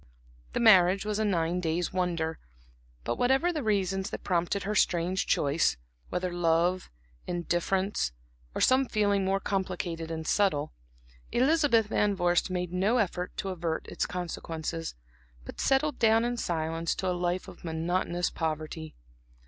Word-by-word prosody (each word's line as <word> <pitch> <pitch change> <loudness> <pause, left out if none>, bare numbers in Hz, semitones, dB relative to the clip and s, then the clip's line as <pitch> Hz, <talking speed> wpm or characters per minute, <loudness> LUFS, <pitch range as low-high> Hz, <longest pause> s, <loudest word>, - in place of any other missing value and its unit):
The - - 0
marriage 190 -3 +6
was 210 0 -1
a - - +2
nine 175 -3 +1
days' 170 0 -1
wonder; 170 -3 -1 0.6
but 120 - -2
whatever 270 +8 +3
the 305 - -2
reasons 195 -4 0
that - - -6
prompted 180 +2 0
her 205 +2 -2
strange 180 -1 +1
choice 140 - +2 0.3
whether 180 0 -2
love, 175 +1 +1 0.4
indifference, 175 - 0 0.4
or - - -2
some 260 +1 +4
feeling 205 -3 +1
more 195 +1 +1
complicated 180 -4 -3
and 160 -1 -4
subtle; 160 - +1 0.6
Elizabeth 270 -3 +3
Van 210 -1 +1
Vorst 175 0 +2
made 180 -1 -3
no 200 +7 +2
effort 180 -5 -1
to 195 - -3
avert 170 -3 -3
its - - -2
consequences, 165 -2 -4 0.5
but - - -9
settled 275 +1 +2
down 225 0 +4
in 245 0 -1
silence 165 -5 -1
to 190 - -3
a 180 - +1
life 180 +1 -1
of 185 -2 -12
monotonous 175 +2 -1
poverty. 155 0 -4
180 Hz, 145 wpm, -29 LUFS, 170-205 Hz, 0.6 s, marriage